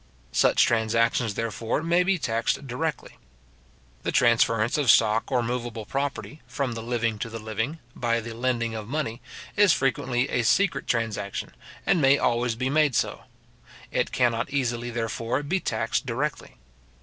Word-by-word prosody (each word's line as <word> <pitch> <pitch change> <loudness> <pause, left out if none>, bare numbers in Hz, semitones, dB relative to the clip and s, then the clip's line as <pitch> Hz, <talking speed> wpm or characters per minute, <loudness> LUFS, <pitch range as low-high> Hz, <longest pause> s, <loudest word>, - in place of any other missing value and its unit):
Such - - +4
transactions, 115 -1 +1
therefore, 115 +5 -2
may 170 +2 +3
be 190 +1 +2
taxed 115 -1 -1
directly. 135 +5 -4 0.8
The - - -2
transference 115 -1 +3
of 140 -5 +1
stock 110 +3 +4
or 125 -2 +2
moveable 120 -2 -4
property, 140 +3 -4
from 140 -5 -2
the 115 -1 -5
living 115 -2 -1
to 115 - -3
the 115 - -6
living, 110 +7 -3 0.2
by 115 -1 0
the 115 0 -7
lending 120 -1 -1
of 110 -2 -6
money, 125 -4 -3 0.3
is 205 -5 +6
frequently 130 -1 0
a 120 - +1
secret 175 - +2
transaction, 110 -4 -2 0.3
and 175 - +3
may 135 0 +5
always 120 -2 +1
be 130 +3 -2
made 145 -2 +2
so. - - -1 0.7
It - - 0
cannot 120 -1 +1
easily, 120 -3 -1
therefore, 115 +3 -2
be 180 +7 0
taxed 115 -5 -1
directly. 135 - -3
120 Hz, 150 wpm, -26 LUFS, 115-140 Hz, 0.8 s, is